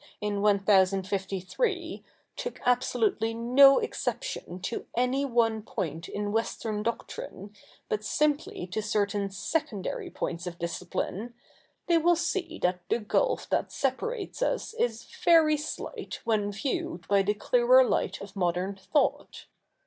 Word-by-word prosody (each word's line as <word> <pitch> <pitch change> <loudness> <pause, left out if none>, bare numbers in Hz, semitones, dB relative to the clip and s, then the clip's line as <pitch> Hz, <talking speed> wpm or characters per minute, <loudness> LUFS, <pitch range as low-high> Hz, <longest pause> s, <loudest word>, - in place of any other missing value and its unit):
in 205 -1 -2
1053, 195 - +1 0.3
took 485 - -5
absolutely 245 - +1
no 265 +4 +7
exception 445 - -3
to 190 +5 -4
any 255 +3 +2
one 230 -4 +2
point 165 -7 -4
in 205 0 -3
Western 220 -1 -1
doctrine, 210 -2 -5 0.3
but 215 0 -2
simply 295 - 0
to 185 +4 -3
certain 205 -2 0
secondary 210 - -3
points 175 +1 -4
of 170 -1 -6
discipline, 180 +6 -4 0.5
they 340 -1 +4
will 345 +2 +4
see 340 0 -2
that 180 0 +1
the - - +3
gulf 360 - 0
that - - 0
separates 405 - -2
us - - -1
is 475 +1 -1 0.2
very 320 -3 +6
slight 300 +1 -6
when 210 -2 +1
viewed 330 - -3
by 200 -1 +4
the 205 +2 0
clearer - - +5
light - - -1
of 200 0 -10
modern 180 +1 0
thought. 280 +10 -1
225 Hz, 125 wpm, -28 LUFS, 195-320 Hz, 0.5 s, no